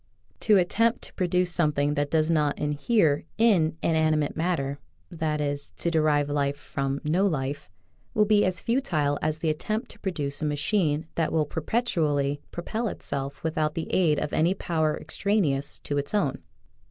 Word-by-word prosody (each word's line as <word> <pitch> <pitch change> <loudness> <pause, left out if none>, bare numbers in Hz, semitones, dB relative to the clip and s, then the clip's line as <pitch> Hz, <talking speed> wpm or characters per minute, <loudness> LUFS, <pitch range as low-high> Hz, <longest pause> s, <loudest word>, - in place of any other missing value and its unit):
To 210 -2 +4
attempt 230 +6 +2
to - - -9
produce 180 -1 +1
some 155 -3 +2
thing 145 +1 +1
that 145 -1 -1
does 160 +1 +2
not 150 -3 +1
inhere 150 +2 +1
in 185 -9 +3
inanimate 155 -2 +2
mat 175 +2 0
ter 140 0 -4 0.3
(that 160 -3 -1
is, 145 -1 -2
to 170 - -1
derive 155 -3 +2
life 145 -1 0
from 140 -1 -3
no 175 +6 +2
life) 145 -3 -3 0.5
will 210 - +4
be 210 0 +4
as 185 -1 0
futile 170 - 0
as 155 0 0
the 160 0 0
attempt 215 - -3
to - - -15
produce 150 -8 -2
a - - 0
machine 150 +1 0
that 165 -2 0
will 155 -2 +2
perpetually 150 - 0
propel 220 +7 -3
itself 140 -7 -5
without 155 -1 0
the 165 - -4
aid 160 -5 +3
of 145 - -3
any 170 +4 +2
power 160 -5 0
extraneous 155 -6 0
to 145 0 -1
its 140 +9 -3
own. 145 -10 0
155 Hz, 170 wpm, -26 LUFS, 145-180 Hz, 0.5 s, To